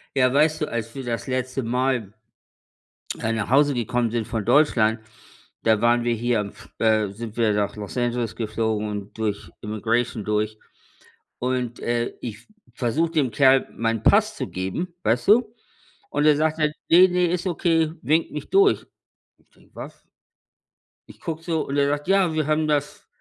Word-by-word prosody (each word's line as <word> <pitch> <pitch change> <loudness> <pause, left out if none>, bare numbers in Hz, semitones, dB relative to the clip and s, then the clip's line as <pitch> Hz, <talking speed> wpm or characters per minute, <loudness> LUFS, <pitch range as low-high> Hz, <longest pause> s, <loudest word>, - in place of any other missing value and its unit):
Ja, 130 -1 +3
weißt 155 +2 +3
du, - - +2
als 115 -1 -4
wir 135 -2 -7
das 115 -1 -3
letzte 130 0 -2
Mal, 125 -3 -1 1.1
äh, 115 - -1
nach 110 -2 -2
Hause 145 +3 +4
gekommen 120 -1 -1
sind 115 -1 -2
von 110 -2 -3
Deutschland, 120 -4 +3 0.6
da 110 -2 +3
waren 120 0 +3
wir 120 - +1
hier 120 +1 0
am 100 -1 -5
F - - -16
äh, 110 -2 +2
sind 110 +1 -8
wir 110 -3 +2
nach 105 0 -1
Los 105 +1 -7
Angeles 120 -2 -1
geflogen 110 -1 -2
und 105 -1 -7
durch 105 -2 -3
Immigration 110 +2 -1
durch 105 +1 -1 0.8
und, 125 -1 -2
äh, 120 0 -1
ich 115 -2 -8 0.3
versuche 145 +8 0
dem 145 -7 +1
Kerl 135 +2 +4
meinen 115 -1 -2
Pass - - +4
zu - - -4
geben, 95 - -4
weißt 120 - +1
du? 225 +1 +4 0.5
Und 150 - 0
der 150 -1 +6
sagt 155 +1 0
dann: 150 -1 +1 0.2
„Ne, 180 +3 +8
ne, 180 -1 +1
ist 175 +2 -1
okay.“ 165 -2 +1
Winkt 160 +3 +1
mich 150 - -7
durch. 395 +1 +3 0.5
Ich - - -33
denke, - - -26
was? - - -9 1.1
Ich - - -15
gucke 165 -1 -5
so 165 -2 -1
und 140 - -2
er 140 0 +3
sagt: 145 +2 -2
„Ja, 190 -3 +3
wir 155 -2 -1
haben 155 0 +1
das 145 -1 -2
125 Hz, 175 wpm, -23 LUFS, 110-155 Hz, 1.1 s, Ne